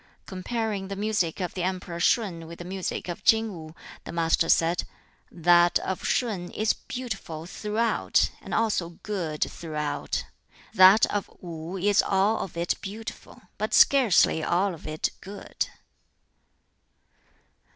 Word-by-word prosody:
Comparing 200 +1 -3
the 195 - -5
music 205 -4 -1
of 180 -2 -3
the 185 - -4
emperor 180 -1 -3
Shun 175 -5 +1
with 170 +1 -9
the 175 - -8
music 185 0 -4
of 175 - -6
King 220 -1 +3
Wu, 160 -2 -10 0.3
the - - -8
Master 165 0 +1
said, 170 +2 +3 0.5
"That 175 0 +4
of 190 - -4
Shun 200 -8 -1
is 215 +1 +1
beautiful 195 -11 -6
throughout, 210 +5 0
and - - -10
also 185 -7 0
good 170 -8 -2
throughout. 150 -3 -3 0.5
That 190 +4 +8
of 205 -1 -2
Wu 170 +1 -7
is 205 +2 +3
all 200 +3 +2
of 170 - -6
it 170 0 -1
beautiful, 215 +3 -8 0.2
but - - 0
scarcely 230 - +5
all 185 +4 +1
of 160 - -10
it 155 0 -1
good." 200 +1 -5
185 Hz, 135 wpm, -26 LUFS, 170-210 Hz, 0.5 s, That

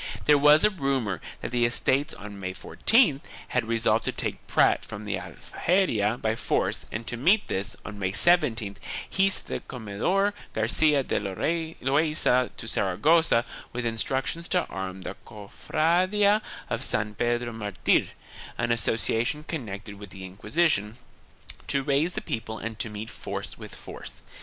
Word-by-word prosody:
There 150 - +6
was 150 +2 +7
a 210 - +5
rumor 135 - -1 0.2
that - - -4
the 120 -1 +2
Estates 135 +5 +1
on 105 -1 -9
May 95 -1 -4
14th 220 - +3 0.3
had 125 -3 0
resolved 115 -1 +2
to - - 0
take - - -4
Prat - - +3
from 105 +1 -8
the 105 -2 -1
Aljaferia 120 - 0
by 110 0 0
force - - -1
and 115 +2 -4
to 120 - -3
meet 185 - +3
this, 95 +1 -2
on 105 -1 -7
May 95 -1 0
17th, 115 - +3 0.3
he 195 0 +3
sent 195 - +1
the - - -3
Comendador 130 - -1 0.2
Garcia 140 +6 +3
de - - 0
Loaisa 145 - +1
to - - -7
Sara 95 -4 0
gossa 155 - +4 0.3
with 120 0 -3
instructions 130 +8 -2
to 180 -2 +1
arm 95 0 -5
the - - -5
Cofradia 180 - +1 0.3
of - - -2
San 105 0 0
Pedro 120 +2 -1
Martir 105 -4 +1 0.3
— - - -13
an 120 0 0
association 115 +4 0
connected 105 - -6
with 100 -1 -9
the 95 0 -9
Inquisition 105 - 0 0.3
— - - -13
to 140 -1 0
raise 145 +5 +1
the - - -3
people 110 -1 -4
and 115 -1 -6
to 120 - -2
meet 105 +2 -6
force - - -5
with - - -10
force. - - -10
120 Hz, 160 wpm, -26 LUFS, 105-155 Hz, 0.3 s, was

